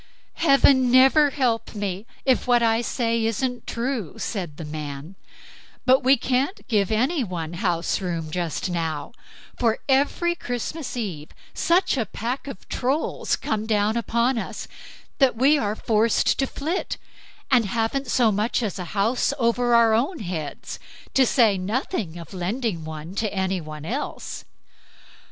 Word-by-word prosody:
"Heaven 275 -4 +5
never 270 +4 +6
help 240 -6 -1
me, 200 +1 -3 0.2
if 260 -2 +2
what 240 -1 +4
I 225 0 +3
say 230 -1 0
isn't 245 +2 -2
true!" 235 - -3
said 175 -9 -4
the 165 - -6
man; 150 +1 -6 0.7
"but 260 +2 +5
we 265 +2 +5
can't 260 - -1
give 210 -5 +1
any 255 +7 +1
one 175 -5 -4
house 175 -1 -1
room 165 -4 -3
just 175 +1 -2
now, 165 -1 -2 0.5
for 230 -2 +2
every 290 +6 +2
Christmas 255 0 -4
Eve 175 -10 -4 0.2
such 345 -3 +2
a 225 -5 -1
pack 245 +8 -4
of 275 - -9
Trolls 270 +5 -1
come 220 0 -3
down 215 0 +2
upon 235 +1 +1
us, - - -6 0.5
that 265 -4 +4
we 280 +6 +4
are 210 -2 -1
forced 220 +1 +2
to 270 - +2
flit, 320 +9 -3 0.5
and 245 -4 +5
haven't 230 +6 -1
so 235 -2 +3
much 215 +4 0
as 200 -4 -3
a 180 - -4
house 230 +7 +2
over 240 -1 +2
our 230 -1 +5
own 275 +11 +1
heads, 170 -7 -5 0.3
to 265 -2 +4
say 220 -7 +4
nothing 200 - -2
of 170 +3 -10
lending 190 0 -2
one 155 +2 -7
to 215 +1 -1
any 190 -1 -1
one 155 -1 -8
else." 255 - -5
230 Hz, 150 wpm, -24 LUFS, 185-255 Hz, 0.7 s, never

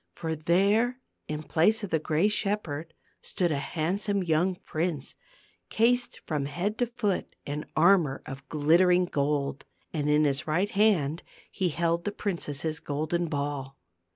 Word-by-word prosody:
For 160 -1 -3
there 200 - +2 0.3
in 150 0 -4
place 210 +9 +2
of 205 - -4
the 160 - +2
gray 155 +5 +2
shepherd 195 -7 -2 0.3
stood 175 -3 -1
a 145 - 0
handsome 185 +7 -1
young 175 +2 +1
prince, 160 -4 -3 0.6
cased 245 +2 +2
from 150 -3 -1
head 180 +9 -3
to 245 - +2
foot 220 -5 -2
in 145 +1 -4
armor 165 -5 +4
of 135 +1 -9
glittering 175 +4 +4
gold; 140 -3 -1 0.3
and 150 -2 -1
in 150 +1 +4
his 140 -1 0
right 180 +7 +1
hand 180 -7 +2 0.3
he 185 -2 0
held 170 +1 0
the 205 - 0
princess's 160 -6 -2
golden 160 +4 -2
ball. 140 -2 -3
165 Hz, 145 wpm, -28 LUFS, 150-195 Hz, 0.6 s, armor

